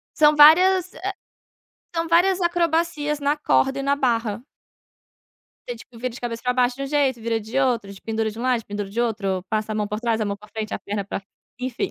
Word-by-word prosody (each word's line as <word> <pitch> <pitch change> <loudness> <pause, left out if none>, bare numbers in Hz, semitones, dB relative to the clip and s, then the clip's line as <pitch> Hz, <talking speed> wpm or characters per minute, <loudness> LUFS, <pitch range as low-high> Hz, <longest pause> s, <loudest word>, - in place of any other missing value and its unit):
São 300 0 +5
vários, 365 +5 +6
eh 385 +5 -4 0.8
são 330 0 -1
várias 360 +3 +3
acrobacias 335 -3 0
na 285 +1 +1
corda 270 -2 +1
e - - -2
na 280 +1 +1
barra. 230 -4 0 1.3
Você, 245 - -4
tipo, 235 +1 -15
vira 255 +2 -3
de 240 - -10
cabeça 235 -1 -4
para 250 - +1
baixo 250 0 +2
de 275 - -5
um - - -2
jeito, 275 -4 +1
vira 225 0 -1
de 220 +5 -7
outro, 235 -7 0
te 190 - -14
pendura 225 0 -1
de 215 - -11
lado, 250 0 +1
te - - -20
pendura 205 -1 -5
de 230 - -2
outro, 200 -6 -1
passa 215 0 -2
a - - -3
mão 210 -1 -1
por 210 +1 -4
trás, 230 -2 0
a - - +1
mão 200 -1 -2
para 210 +1 -16
frente, 215 0 -5
a - - -3
perna 200 -1 -4
para 200 - -5 0.4
enfim. 255 +9 -2
245 Hz, 225 wpm, -23 LUFS, 220-295 Hz, 1.3 s, vários